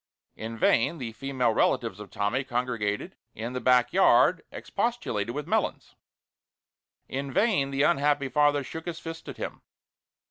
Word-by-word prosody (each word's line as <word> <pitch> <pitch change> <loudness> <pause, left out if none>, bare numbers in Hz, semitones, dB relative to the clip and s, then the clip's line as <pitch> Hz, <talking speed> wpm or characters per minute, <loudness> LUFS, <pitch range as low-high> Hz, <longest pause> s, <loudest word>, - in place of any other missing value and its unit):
In 115 +1 -6
vain 115 +8 +3
the 120 -6 -5
female 125 +1 0
relatives - - +1
of - - -9
Tommy 110 +7 -1
congregated 120 -5 -2 0.2
in 115 +3 -5
the 125 - -3
back 125 -1 +4
yard 180 -2 +5
expostulated 130 - -2
with 150 0 -3
Melons; - - -1 1.1
in 135 +1 -4
vain 190 - +2
the 140 +1 +1
unhappy 145 -3 +2
father 145 0 +2
shook 160 +5 -8
his 170 -2 -4
fist 165 0 -8
at - - -8
him. - - -6
135 Hz, 145 wpm, -27 LUFS, 120-150 Hz, 1.1 s, yard